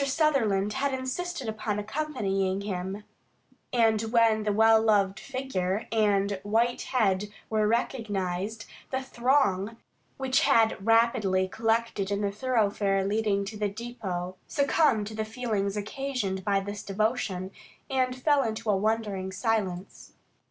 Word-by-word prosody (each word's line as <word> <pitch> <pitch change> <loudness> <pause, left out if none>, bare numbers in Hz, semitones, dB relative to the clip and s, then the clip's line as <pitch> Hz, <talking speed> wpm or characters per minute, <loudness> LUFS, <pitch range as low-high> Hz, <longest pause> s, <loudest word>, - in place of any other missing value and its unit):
Sutherland 260 -9 +1
had 270 +1 0
insisted 265 +2 -4
upon 215 -1 -2
accompanying 205 -6 -1
him, 195 0 -4 0.7
and 225 -3 +3
when 225 -1 +3
the 210 - +2
well 220 +1 +5
loved 200 -3 +2
figure 230 -7 -3
and 200 -3 +2
white 230 +4 +1
head 205 -5 +1 0.2
were 215 -1 +2
recognised, 210 -3 -2 0.2
the 265 0 -2
throng, 235 -5 +1 0.4
which 260 -1 +2
had 220 -3 +3
rapidly 220 -4 +3
collected 225 -1 0
in 200 0 -1
the 200 -1 0
thoroughfare 205 -4 +1
leading 205 -1 0
to 215 +2 -7
the 210 -1 0
depot, 195 -5 -5
succumbed 280 -6 +2
to 215 - -7
the 220 0 -2
feelings 215 -3 -2
occasioned 210 -4 -3
by 200 0 +2
this 205 +1 -5
devotion, 200 -2 -1 0.4
and 255 -1 0
fell 285 +2 +3
into 220 -2 -1
a - - +3
wondering 205 -2 -1
silence. 195 -3 -2
215 Hz, 130 wpm, -28 LUFS, 195-240 Hz, 0.7 s, well